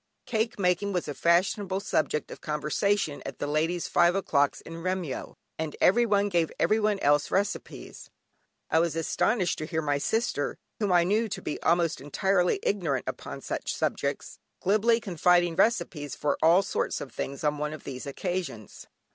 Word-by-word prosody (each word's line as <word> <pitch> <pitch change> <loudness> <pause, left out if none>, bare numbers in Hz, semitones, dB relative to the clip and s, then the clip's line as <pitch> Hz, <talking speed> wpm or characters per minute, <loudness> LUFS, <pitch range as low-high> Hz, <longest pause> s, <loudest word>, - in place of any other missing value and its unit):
Cake 225 -1 -1
making 195 +1 +1
was 180 -3 -1
a 145 - -3
fashionable 185 +4 +1
subject 155 -6 -1
of - - -9
conversation 150 +2 0
at - - -7
the - - -3
ladies' 160 +4 0
"five 175 +1 +3
o'clocks" 145 -7 +1
in 165 0 -9
Remyo, 185 -6 -3 0.2
and 160 -2 -3
everyone 205 -1 +4
gave 170 -5 +1
everyone 215 -1 +2
else 145 0 +3
recipes. 200 +2 -3 0.6
I 160 - +4
was 170 -1 +1
astonished 180 +4 0
to 155 - -4
hear 160 -2 -2
my 145 -1 0
sister 220 -5 -1 0.2
(whom 205 -3 0
I 175 -1 +5
knew 215 +5 +1
to - - -4
be - - -4
almost 170 -3 +2
entirely 180 +5 +1
ignorant 165 -10 0
upon - - -6
such - - -3
subjects) - - -2 0.2
glibly 215 +4 +3
confiding 175 -3 +2
recipes 155 - 0
for 145 -1 0
all 170 +4 +5
sorts - - -2
of 130 - -7
things, 140 +4 -5
on 150 -1 0
one 150 0 -2
of 155 - -8
these 130 +1 -7
occasions. 175 - -5
175 Hz, 165 wpm, -27 LUFS, 150-200 Hz, 0.6 s, I